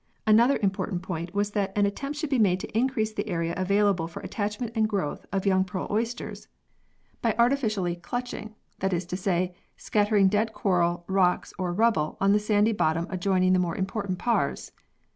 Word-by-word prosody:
Another 235 +5 +5
important 190 -2 -1
point 170 -1 -4
was 205 0 0
that 200 -1 -2
an 205 - +4
attempt 275 +9 -3
should 300 -1 -3
be 265 - +2
made 185 -4 +3
to - - -8
increase 225 -2 +1
the 215 - -3
area 170 -2 -1
avail 200 +2 +2
able 175 -5 0
for 170 - -8
attachment 210 +3 -3
and 220 -2 +1
growth 195 -8 -3
of 195 0 -1
young 190 -1 +3
pearl 185 -1 -4
134 - - -7
PEARLS 220 +3 +1
[CH. - - -8 0.3
oysters, - - -20 0.7
by 230 -3 +1
artificial 235 -5 +2 0.2
"culching," 230 0 -5 0.2
that 190 0 0
is 175 0 -1
to 180 - -4
say, 180 -1 0 0.2
scattering 205 -2 +2
dead 215 +3 +1
coral, 175 -3 +1
rocks 190 -2 +1
or 180 -2 -1
rubble 195 -6 +1
on 195 0 +3
the 210 - +4
sandy 210 +1 +2
bottom 165 -4 +1
adjoining 185 0 +2
the 185 - +4
more 175 -2 -1
important 195 -1 -2
paars. 210 -10 -1
200 Hz, 195 wpm, -26 LUFS, 185-220 Hz, 0.7 s, Another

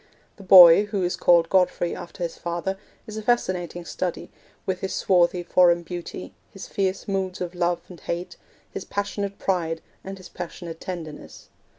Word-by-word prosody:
The - - -13
boy, 185 0 +9
who 205 -2 -2
is 180 - 0
called 170 -1 +4
Godfrey 180 -2 +1
after 175 - -8
his 170 - -3
father, 175 +3 -3 0.3
is 215 -1 -8
a - - -3
fascinating 180 -7 -1
study, 180 0 -4 0.3
with 185 -1 -2
his 190 - -3
swarthy 175 -1 +2
foreign 175 0 +4
beauty, 175 +1 -7 0.2
his 195 - -10
fierce 195 -1 -2
moods 190 -2 -2
of 180 -1 -4
love 175 -1 0
and 180 -3 -12
hate, 175 +1 -5 0.4
his - - -5
passionate 200 0 -4
pride, 165 -4 -1 0.2
and 195 0 -7
his 185 -1 -12
passionate 170 -2 -8
tenderness. 165 -5 -8
180 Hz, 165 wpm, -24 LUFS, 175-190 Hz, 0.4 s, boy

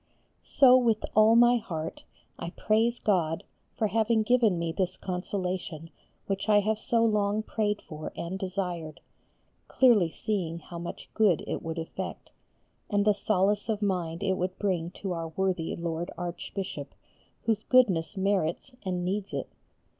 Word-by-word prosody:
So 260 -3 +6
with 230 -4 +2
all 215 +1 +6
my 240 +1 +6
heart 165 -8 -5 0.3
I 170 - -4
praise 225 +6 +1
God 170 -6 +1 0.3
for 220 - +1
having 220 +1 +2
given 230 -5 +3
me 170 -1 -1
this 185 +1 -1
consolation 180 -3 -4 0.3
which 195 +2 -2
I 210 -1 +6
have 215 +1 0
so 230 +1 +2
long 210 -1 +1
prayed 210 -1 -1
for 155 0 -7
and 180 +3 -4
desired, 180 -5 -4 0.7
clearly 230 -10 +4
seeing 175 -3 -2
how 170 +1 -9
much 170 - -8
good 205 -8 +3
it - - -3
would 165 0 -5
effect, 165 0 -6 0.6
and 205 -1 +2
the 210 - +5
solace 205 +1 +1
of 215 -1 -1
mind 180 -3 -1
it 190 -1 +1
would 185 +1 -2
bring 180 -5 -1
to 190 +1 -6
our 165 -1 -3
worthy 180 0 -1
Lord 170 0 -3
Archbishop, 175 -3 -5 0.5
whose 220 -2 0
goodness 200 -8 +3
merits 190 +3 0
and 180 -2 -2
needs 195 +2 -2
it. - - -4
190 Hz, 150 wpm, -28 LUFS, 170-215 Hz, 0.7 s, So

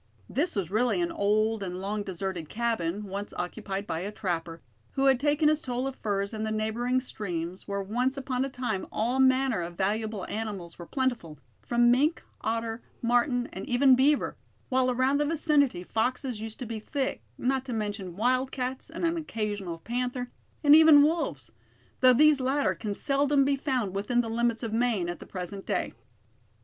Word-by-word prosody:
This 325 +6 -1
was 190 -4 -2
really 245 - +2
an 345 -1 0
old 215 -3 +1
and 180 -2 -4
long 205 +2 -2
deserted 190 -4 -4
cabin, 210 -5 -1
once 200 +1 -5
occupied 195 +2 -4
by 160 - -3
a 195 +4 -4
trapper, 170 -6 -4 0.3
who 270 - +1
had 265 -2 +5
taken 295 +2 +2
his 305 0 +3
toll 250 -1 -2
of 270 -1 -3
furs 200 -2 -2
in 215 - -4
the 220 - -1
neighboring 220 +4 0
streams 180 -7 -5
where 200 -1 -2
once 250 +7 -1
upon 260 -1 -1
a 270 - -2
time 245 -7 -3
all 240 +4 0
manner 260 -5 +3
of 170 0 -6
valuable 210 +1 -1
animals 205 -6 -5
were 170 - -8
plentiful, 245 - -2 0.2
from 240 0 +3
mink, 295 +7 +2 0.2
otter, 225 0 -2 0.2
marten, 245 +1 +2
and - - -6
even 260 +2 +5
beaver; 280 +3 +2 0.3
while 255 0 +2
around 260 +3 +2
the 295 - +2
vicinity 290 - +2
foxes 245 +2 -1
used 220 0 -6
to 255 - -5
be 225 -1 -4
thick, 270 +5 -2 0.2
not 260 +1 0
to 260 - -5
mention 205 -5 -3
wildcats, 255 +3 -1
an 330 - -6
occasional 215 - -2
panther, 245 +6 -3 0.3
and 295 0 +8
even 315 -2 +8
wolves; 285 - -1 0.5
though 255 0 +7
these 300 +3 +5
latter 270 +3 +1
can 210 -3 -4
seldom 280 +1 +2
be 280 0 +2
found 255 -8 -1
within 225 +5 +1
the 230 - -5
limits 235 +1 0
of 225 -2 -3
Maine 225 -7 +1
at 175 - -5
the - - -11
present 195 +1 -6
day. - - -1
235 Hz, 180 wpm, -28 LUFS, 200-265 Hz, 0.5 s, and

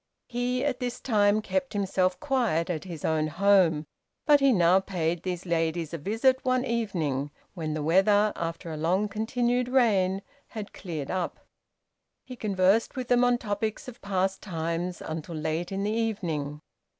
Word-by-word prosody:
He, 250 +1 -1
at 270 -3 -1
this 245 -2 -3
time, 210 -3 +2
kept 275 +1 -2
himself 190 -2 0
quiet 235 - 0
at 160 +1 -4
his 170 -5 -6
own 155 -1 +1
home, 175 -3 +3 0.4
but 295 -2 +6
he 275 -1 +4
now 180 -3 +5
paid 175 -3 -2
these 180 -1 -4
ladies 165 -1 -1
a 165 - -3
visit 230 - +1
one 255 -1 +1
evening, 170 - -1 0.2
when 155 -3 -3
the 155 - -2
weather, 205 +6 +4
after 165 0 -4
a 155 - -5
long 180 +7 +1
continued 240 +4 0
rain, 200 -7 +2 0.2
had 215 -2 -7
cleared 160 -7 -5
up. 185 -2 -3 0.8
He 255 - -8
conversed 200 0 +2
with 255 -2 -4
them 245 0 +4
on 245 0 +4
topics 215 0 -3
of 245 -2 -10
past 190 -1 -1
times 170 -1 -3
until 160 +1 -5
late 160 +3 -2
in 195 0 -2
the 210 - 0
evening. 170 -10 -2
195 Hz, 160 wpm, -27 LUFS, 165-230 Hz, 0.8 s, but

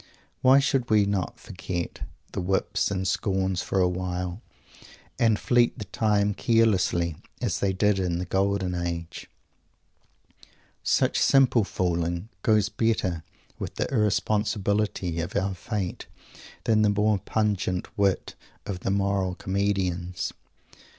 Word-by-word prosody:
Why 130 +1 +7
should 135 -3 +1
we 105 -2 +4
not 100 -2 -2
forget 90 -4 -5 0.3
the - - -3
whips 95 +2 0
and 95 -2 -2
scorns 95 -3 0
for 95 - -1
a 90 - +4
while, 90 +1 -3 0.8
and 115 -3 +4
fleet 120 +2 +2
the 110 - -6
time 105 +1 +1
carelessly, 95 -8 +2 0.2
"as - - -1
they 100 - +1
did 100 +1 +2
in 90 -2 0
the 90 - -3
golden 95 0 0
age?" 85 -1 -4 1.5
Such - - +2
simple 130 -4 +4
fooling 85 0 -1
goes 105 -1 +3
better 105 -8 0 0.4
with - - -5
the - - -1
irresponsibility 105 -4 0
of 90 +3 -5
our 95 +1 0
fate 95 0 -4 0.6
than 110 -1 +3
the 105 - +4
more 105 0 +2
pungent 100 -3 -1
wit 100 -2 +1 0.3
of 95 -3 -4
the - - -3
moral 100 -2 0
comedians. 95 -3 -1
95 Hz, 125 wpm, -26 LUFS, 90-105 Hz, 1.5 s, Why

